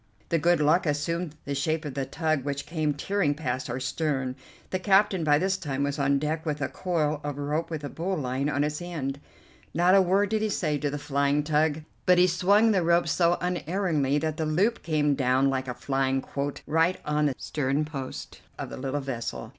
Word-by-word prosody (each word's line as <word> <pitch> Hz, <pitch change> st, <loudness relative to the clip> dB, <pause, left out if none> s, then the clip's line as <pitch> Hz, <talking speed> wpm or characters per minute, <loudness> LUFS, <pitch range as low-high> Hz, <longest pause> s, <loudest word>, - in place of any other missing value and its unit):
The 165 Hz, -, +2 dB
good 175 Hz, +1 st, +3 dB
luck 155 Hz, +4 st, +3 dB
assumed 155 Hz, +2 st, -1 dB
the 140 Hz, -, -2 dB
shape 155 Hz, +3 st, -1 dB
of 140 Hz, -3 st, -5 dB
a 135 Hz, -1 st, -1 dB
tug 155 Hz, 0 st, -1 dB
which 140 Hz, 0 st, -3 dB
came 155 Hz, -3 st, -1 dB
tearing 155 Hz, -1 st, 0 dB
past 130 Hz, -4 st, -3 dB
our 125 Hz, +2 st, -2 dB
stern. 135 Hz, -2 st, -1 dB, 0.4 s
The 185 Hz, -, 0 dB
captain 195 Hz, -2 st, +3 dB
by 145 Hz, -1 st, +4 dB
this 190 Hz, +4 st, +1 dB
time 140 Hz, -6 st, -2 dB
was 140 Hz, +1 st, -2 dB
on 140 Hz, 0 st, +3 dB
deck 155 Hz, +2 st, -2 dB
with 150 Hz, -2 st, -2 dB
a 145 Hz, -, -1 dB
coil 155 Hz, -5 st, -1 dB
of 145 Hz, -1 st, -4 dB
rope 150 Hz, +3 st, -2 dB
with 160 Hz, -3 st, -5 dB
a 145 Hz, -, -4 dB
bowline 145 Hz, -6 st, -2 dB
on 145 Hz, 0 st, +1 dB
its 150 Hz, +2 st, -2 dB
end. 145 Hz, -6 st, -4 dB, 0.6 s
Not 175 Hz, +3 st, +4 dB
a 195 Hz, -, +7 dB
word 195 Hz, +2 st, +2 dB
did 220 Hz, 0 st, 0 dB
he 215 Hz, -, 0 dB
say 155 Hz, -7 st, 0 dB
to 145 Hz, -, -1 dB
the 145 Hz, -, -3 dB
flying 140 Hz, 0 st, +1 dB
tug, 155 Hz, 0 st, +1 dB, 0.3 s
but 180 Hz, 0 st, +6 dB
he 180 Hz, -, +6 dB
swung 200 Hz, +5 st, +4 dB
the 195 Hz, -3 st, +2 dB
rope 170 Hz, 0 st, +3 dB
so 170 Hz, +3 st, +2 dB
unerringly 175 Hz, -5 st, 0 dB
that 155 Hz, +1 st, -2 dB
the 160 Hz, -, -1 dB
loop 195 Hz, +10 st, +1 dB
came 150 Hz, -3 st, +1 dB
down 130 Hz, 0 st, +2 dB
like 130 Hz, 0 st, -2 dB
a 125 Hz, -, -4 dB
flying 135 Hz, +1 st, 0 dB
quoit 140 Hz, +1 st, -4 dB
right 165 Hz, +4 st, +2 dB
on 150 Hz, 0 st, +1 dB
the 135 Hz, -, -1 dB
sternpost 140 Hz, -1 st, -3 dB, 0.2 s
of -, -, -6 dB
the -, -, -6 dB
little 135 Hz, +2 st, -2 dB
vessel. 115 Hz, -, -5 dB
150 Hz, 210 wpm, -27 LUFS, 140-170 Hz, 0.6 s, a